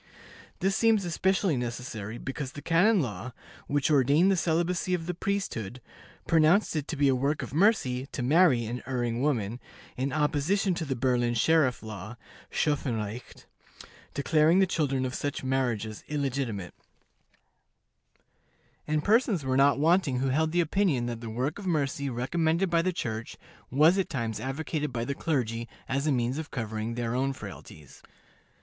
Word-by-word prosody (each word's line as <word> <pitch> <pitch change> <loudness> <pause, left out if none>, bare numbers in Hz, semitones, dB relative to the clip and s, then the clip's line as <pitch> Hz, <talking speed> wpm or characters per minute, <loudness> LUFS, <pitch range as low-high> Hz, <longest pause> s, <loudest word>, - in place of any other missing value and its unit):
This 195 +1 +1
seemed 220 -3 +3
especially 185 0 +1
necessary, 120 -3 -5
because 135 +1 -5
the 145 - -8
canon 185 +5 +4
law, 115 -1 -5 0.3
which 145 +1 +1
ordained 145 +7 +4
the - - +3
celibacy 175 +1 0
of 165 -2 -5
the 180 - -2
priesthood, 165 - -3 0.5
pronounced 165 +4 +3
it 150 -2 -2
to - - -3
be 145 -1 +2
a 135 - +4
work 140 +4 0
of - - -8
mercy 145 - +2
to 125 - -5
marry 140 -3 +4
an 120 +3 -4
erring 120 -2 -1
woman, 120 -6 0 0.4
in 135 +2 -2
opposition 155 +7 +1
to 170 -1 -3
the 135 -2 -2
Berlin 120 -1 +1
sheriff 140 0 +2
law 110 +1 -8 0.3
(schoffen 145 -6 0
recht) 110 +3 -7 0.7
declaring 155 +4 +3
the 190 - +5
children 140 -7 0
of 130 - -3
such 145 0 -3
marriages 120 -5 -1
illegitimate; 135 -9 -2 2.1
and 150 0 0
persons 210 - +2
were 130 0 0
not 140 +1 +4
wanting 160 -2 +2
who 135 +1 0
held 155 +4 +1
the 175 +1 +3
opinion 165 -7 +1
that 120 -1 -4
the 115 - -6
work 130 - -2
of 200 - -6
mercy 140 -4 0
recommended 160 +8 0
by 170 -1 +4
the 185 +2 0
Church 115 -9 -5 0.3
was 155 +8 +4
at 190 - -1
times 115 -7 -3
advocated 150 +2 -3
by 120 -1 -3
the 140 - -2
clergy 120 -7 -2 0.2
as 140 +3 -1
a - - +3
means 125 +2 0
of 160 - -6
covering 110 -1 -4
their 120 -1 -2
own 135 +2 0
frailties. 75 - -11
140 Hz, 160 wpm, -28 LUFS, 120-165 Hz, 2.1 s, the